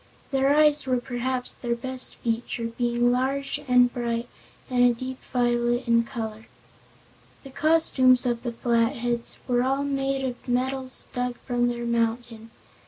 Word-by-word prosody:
Their 270 0 +2
eyes 300 -2 +3
were 255 -1 +2
perhaps 250 +1 -2
their 235 -1 -2
best 255 +2 -4
feature, 230 0 -3
being 240 0 +1
large 275 +3 -1
and 250 -1 +4
bright 235 -1 -2 0.4
and 250 -2 +2
a 245 -1 +4
deep 255 +2 -6
violet 240 0 +1
in 230 0 +4
color. 220 -3 -6 1.0
The 270 - -11
costumes 265 -4 +4
of 240 -1 0
the 240 -1 -3
Flatheads 235 0 0
were 245 -1 +2
all 270 +2 0
made 275 -1 -1
of 250 0 -6
metals 255 +1 -1
dug 250 0 -2
from 245 -1 +1
their 240 0 -3
mountain. 230 -1 -2
245 Hz, 145 wpm, -25 LUFS, 235-260 Hz, 1.0 s, and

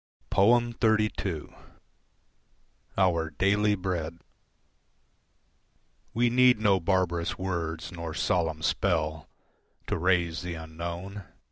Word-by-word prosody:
XXXII. 110 -5 +2 1.5
"Our 85 -4 +2
Daily 100 +6 +2
Bread" 85 -4 -3 2.0
We 120 +1 +3
need 125 0 +5
no 100 -3 +3
barbarous 85 -2 0
words 85 -3 -3
nor 85 -3 -6
solemn 80 -4 0
spell 80 -5 0 0.6
To - - -2
raise 85 -1 +1
the 90 -2 -5
unknown. 85 +4 -6
90 Hz, 85 wpm, -28 LUFS, 80-100 Hz, 2.0 s, need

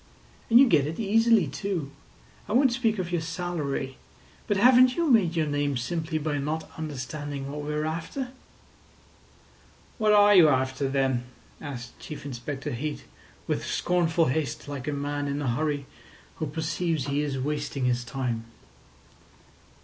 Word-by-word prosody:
And 235 - +8
you 275 - +8
get 150 - +3
it 160 - -5
easily, 225 -1 +4
too. 155 0 -3 0.6
I - - -1
won't 260 +1 +5
speak 230 -3 +1
of 180 -2 -3
your 175 -2 0
salary, 160 -6 -3 0.5
but 205 - +1
haven't 250 +3 +6
you 340 -1 +1
made 185 -8 +4
your 160 -2 +2
name 145 -2 0
simply 160 +6 -2
by 150 -1 -1
not 155 +3 -3
understanding 145 -1 -5
what 150 +1 -5
we 145 +1 -4
are 150 0 -1
after?" 170 - -4 1.7
"What 215 -1 +3
are 205 0 +7
you 175 -6 +8
after, 130 0 0
then?" 135 -2 0 0.4
asked 120 -4 -7
Chief 150 -2 -8
Inspector 135 +1 -5
Heat, 145 +5 -4 0.4
with - - -1
scornful 170 -2 +1
haste, 150 +1 -2
like 140 -1 -6
a - - 0
man 145 0 -2
in 140 +1 -2
a 145 - -2
hurry 145 +3 -1 0.5
who 155 - -2
perceives 160 0 -1
he 140 +1 0
is 145 -2 -2
wasting 145 -1 -2
his 125 -1 +1
time. 120 -3 -3
150 Hz, 155 wpm, -27 LUFS, 140-175 Hz, 1.7 s, And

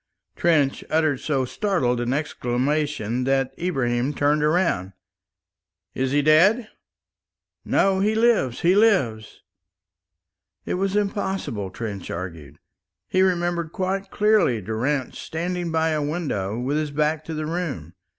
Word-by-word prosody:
Trench 150 -5 +2
uttered 155 -4 +1
so 135 -4 0
startled 125 - 0
an 120 +1 -1
exclamation 135 -3 -1
that 135 -1 +1
Ibrahim 135 -5 0
turned 145 +2 +2
round. 150 - +1 1.0
"Is 130 0 -1
he 145 +1 +2
dead?" 190 - +4 1.0
"No, 195 -1 +2
he 210 +3 +1
lives, 220 - +2
he 175 +2 +4
lives." 185 - +1 1.2
It - - -2
was 195 +2 -1
impossible, 195 - -2
Trench 100 -1 -6
argued. 85 -5 -7 0.5
He 185 - +2
remembered 175 -3 0
quite 190 +1 -2
clearly 210 - +3
Durrance 120 +7 -2
standing 175 +1 -3
by 160 0 +1
a 155 -1 0
window 145 - -2
with 130 +5 -1
his 155 -1 -1
back 150 +2 0
to 160 - -5
the 155 0 -3
room. 150 - -4
150 Hz, 125 wpm, -23 LUFS, 125-180 Hz, 1.2 s, dead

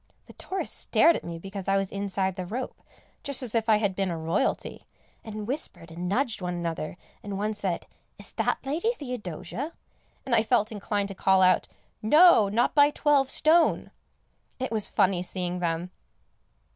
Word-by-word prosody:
The - - -14
tourists 380 - -3
stared 335 - +4
at - - -4
me 170 -1 -6
because 195 +2 -7
I 195 0 +3
was 195 -1 -2
inside 195 -2 -2
the 185 -1 -5
rope, 245 +6 -5 0.4
just 280 -2 -1
as 240 - -2
if 225 -1 0
I 215 - +7
had 205 -3 0
been 195 -1 0
a 170 - -3
Royalty, 160 +1 -2 0.4
and 215 -1 -6
whispered 230 - -4
and 175 +2 -4
nudged 230 0 0
one 180 -1 -3
another, 170 -1 -4 0.2
and 200 -1 -5
one 210 +2 -1
said, 195 -4 -2 0.3
"Is - - -6
that - - -1
Lady 330 +12 0
Theodosia?" 250 - -6 0.5
and 260 - -2
I 225 - +5
felt 220 -1 +1
inclined 205 -1 -2
to - - -5
call 190 0 +3
out 185 0 +4 0.3
"No, 300 - +6
not 225 +4 +1
by 290 0 +6
twelve 290 -3 +2
stone." 325 +4 +3 0.7
It 260 -1 -3
was 215 -2 +1
funny 185 -2 +2
seeing 180 0 -4
them. 170 +1 -2
205 Hz, 175 wpm, -27 LUFS, 185-255 Hz, 0.7 s, I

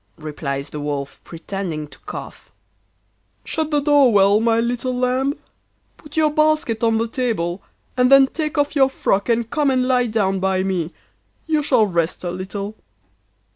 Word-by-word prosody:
replies 145 -2 -5
the 150 - -6
Wolf, 145 -1 -4
pretending 165 -2 -5
to - - -14
cough. - - -9 0.9
'Shut 315 -2 -2
the 295 -2 +2
door 285 -3 +4
well, 200 0 +5
my 225 0 +2
little 245 +2 -1
lamb. 255 +3 0 0.6
Put 300 0 -12
your 310 -1 +3
basket 305 -6 +1
on 225 -1 +3
the 230 +1 0
table, 215 -8 -2 0.3
and 250 +1 +3
then 275 0 +8
take 305 +2 -4
off 290 +1 +1
your 270 -2 +4
frock 200 -5 0
and 230 -1 +1
come 285 +4 +1
and 255 -1 +1
lie 250 -1 +2
down 200 -4 0
by 190 0 0
me: 180 -4 -2 0.5
you 310 -2 +1
shall 255 -7 +3
rest 170 -3 -1
a 175 - -2
little. 195 +3 -5
230 Hz, 165 wpm, -20 LUFS, 185-270 Hz, 0.9 s, then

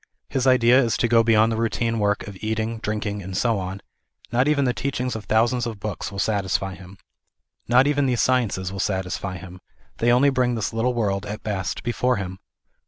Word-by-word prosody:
His 135 -1 0
idea 125 0 +5
is 115 - 0
to - - +1
go 115 0 +5
beyond 115 0 +4
the 110 - -1
routine 115 0 0
work 105 -1 0
of 100 - -8
eating, 110 +1 -2
drink 105 0 -3
ing 105 0 -3
and 95 0 -5
so 115 -2 +1
on; 95 +1 -6 0.5
not 125 +3 +2
even.4 145 -2 +2
the 125 - +1
teaching 130 -1 -2
of 110 -2 -6
thousands 120 +2 +2
of 110 -3 -6
books 105 -2 -4
will 100 - -8
satisfy 95 -2 0
him. 95 +1 -13 0.7
Not 125 +3 +5
even 145 -1 +2
the 125 - +1
sciences 115 -7 +1
will 95 - -6
satisfy 95 0 -2
him; 90 +1 -11 0.4
they 120 +1 +2
only 135 +4 +4
bring 125 -2 +1
this 110 0 -2
little 120 +2 0
world, 100 -3 -1
at 105 +1 -6
best, 95 -4 -3
before 125 +1 +1
him. 95 -3 -5
110 Hz, 205 wpm, -23 LUFS, 100-125 Hz, 0.7 s, idea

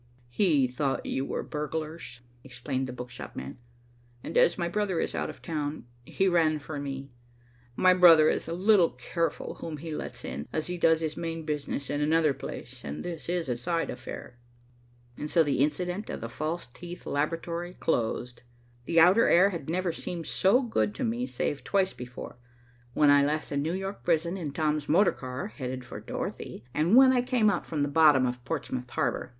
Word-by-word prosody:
"He 145 0 +3
thought 135 +2 -2
you 135 +1 -2
were - - -3
burglars," 150 -3 -5 0.2
explained 130 +1 -3
the - - -5
book 125 0 -8
shop - - -9
man, 65 - -7 0.6
"and 160 - -6
as 170 - +4
my 170 -2 -1
brother 190 -2 -1
is - - -1
out - - -2
of - - -10
town, 150 -4 -3 0.2
he 195 +10 0
ran 165 -4 +3
for 150 0 -6
me. 140 -1 -5 0.6
My 185 +6 +5
brother 170 -4 +8
is - - 0
a 165 - -3
little 185 -1 +4
careful 170 -1 -3
whom 160 -2 -5
he 160 +2 -6
lets - - -6
in, 70 +3 -5
as 155 - -2
he 180 0 -4
does 160 -1 +4
his 155 -1 -2
main 165 -1 -4
business 145 -2 -3
in 145 - -2
another 155 0 +3
place, - - -8
and 70 +1 -6
this 170 -2 -6
is 175 -2 -1
a 125 - 0
side 165 +8 -1
affair." 125 -1 -8 0.8
And 150 - -4
so 165 0 +4
the 145 -4 0
incident 180 +7 -1
of - - -4
the 115 - -5
false 155 +7 -3
teeth 175 +8 -10
laboratory 170 +4 -2
closed. 120 -2 -1 0.4
The 165 - +3
outer 185 +8 +6
air 190 +4 +5
had 165 -5 -6
never 180 +1 0
seemed 165 0 -5
so 210 +8 +3
good 110 - 0
to - - -3
me 120 +2 -1
save 135 +3 -2
twice 195 -2 +1
before, 125 -1 -9 0.6
when 145 -1 +5
I 145 0 +6
left 150 +2 -1
the 140 - -1
New 155 +4 0
York 195 +1 -5
prison 170 +1 +1
in 165 -7 -4
Tom's 150 0 -1
motor 180 +6 +5
car 130 +9 -6
headed 130 - -6
for - - -8
Dorothy, 115 - -6
and 165 +8 +3
when 260 0 +8
I 250 - +3
came 245 -4 +2
up 180 - -3
from 150 -3 -1
the - - +1
bottom 145 -3 +5
of 125 0 -3
Portsmouth 130 -4 -4
Harbor. - - -1
155 Hz, 195 wpm, -28 LUFS, 135-175 Hz, 0.8 s, brother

